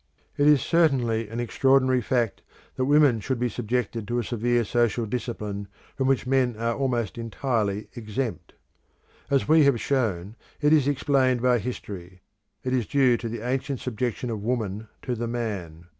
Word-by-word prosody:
It 145 Hz, -, +3 dB
is 150 Hz, -4 st, +5 dB
certainly 125 Hz, -10 st, +2 dB
an 115 Hz, +2 st, -5 dB
extraordinary 130 Hz, +1 st, +3 dB
fact 120 Hz, -2 st, 0 dB, 0.3 s
that 130 Hz, -, 0 dB
women 145 Hz, -4 st, +4 dB
should 130 Hz, +5 st, -2 dB
be 125 Hz, +1 st, 0 dB
subjected 115 Hz, -2 st, -2 dB
to 120 Hz, -, -1 dB
a 120 Hz, -, 0 dB
severe 120 Hz, +1 st, 0 dB
social 120 Hz, +1 st, +1 dB
discipline, 105 Hz, -3 st, -4 dB, 0.3 s
from 135 Hz, -1 st, 0 dB
which 135 Hz, -2 st, +2 dB
men 130 Hz, -2 st, +2 dB
are 115 Hz, +1 st, 0 dB
almost 120 Hz, -5 st, -1 dB
entirely 115 Hz, -3 st, -1 dB
exempt. 120 Hz, +1 st, -4 dB, 0.8 s
As 140 Hz, -2 st, +2 dB
we 155 Hz, 0 st, +6 dB
have 135 Hz, -4 st, +3 dB
shown, 110 Hz, -8 st, -1 dB, 0.2 s
it 150 Hz, 0 st, +4 dB
is 145 Hz, -3 st, +4 dB
explained 130 Hz, -3 st, +2 dB
by 125 Hz, -1 st, +4 dB
history; 95 Hz, -5 st, -7 dB, 0.4 s
it 130 Hz, -, -1 dB
is 120 Hz, -5 st, 0 dB
due 130 Hz, -4 st, +4 dB
to 115 Hz, 0 st, -5 dB
the 115 Hz, -1 st, -5 dB
ancient 135 Hz, 0 st, -2 dB
subjection 120 Hz, 0 st, -3 dB
of 110 Hz, -2 st, -4 dB
woman 110 Hz, -2 st, -2 dB, 0.2 s
to 125 Hz, -, -2 dB
the 120 Hz, 0 st, -3 dB
man. 100 Hz, -9 st, -4 dB
120 Hz, 165 wpm, -25 LUFS, 110-130 Hz, 0.8 s, we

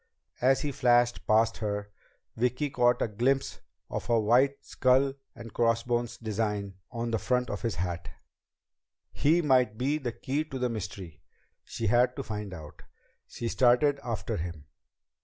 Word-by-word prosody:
As 130 Hz, +2 st, +4 dB
he 145 Hz, -, -2 dB
flashed 120 Hz, -2 st, +2 dB
past 110 Hz, +1 st, +3 dB
her, 105 Hz, -1 st, -3 dB, 0.4 s
Vicki 125 Hz, +5 st, 0 dB
caught 120 Hz, -1 st, +3 dB
a -, -, 0 dB
glimpse 125 Hz, +6 st, 0 dB, 0.3 s
of -, -, -5 dB
a 115 Hz, -1 st, +4 dB
white 125 Hz, +6 st, +2 dB
skull 130 Hz, +1 st, +2 dB, 0.2 s
and 115 Hz, -, -10 dB
crossbones 120 Hz, 0 st, 0 dB
design 105 Hz, -3 st, -2 dB, 0.2 s
on 115 Hz, -1 st, -3 dB
the 115 Hz, -, 0 dB
front 125 Hz, +4 st, 0 dB
of 100 Hz, -3 st, -4 dB
his 115 Hz, -, -2 dB
hat. 85 Hz, 0 st, -3 dB, 1.0 s
He 165 Hz, +4 st, +2 dB
might 125 Hz, -6 st, +3 dB
be 140 Hz, +5 st, 0 dB
the 125 Hz, -4 st, -3 dB
key 140 Hz, +5 st, -2 dB
to 135 Hz, -, -6 dB
the 125 Hz, -1 st, 0 dB
mystery! 95 Hz, -7 st, -6 dB, 0.4 s
She 115 Hz, -, -5 dB
had 120 Hz, +4 st, +3 dB
to 140 Hz, -, -4 dB
find 105 Hz, -3 st, -5 dB
out! 75 Hz, -4 st, -10 dB, 0.5 s
She 120 Hz, -, -5 dB
started 130 Hz, +4 st, +3 dB
after 115 Hz, -4 st, -3 dB
him. 85 Hz, -3 st, -6 dB
120 Hz, 155 wpm, -29 LUFS, 105-130 Hz, 1.0 s, As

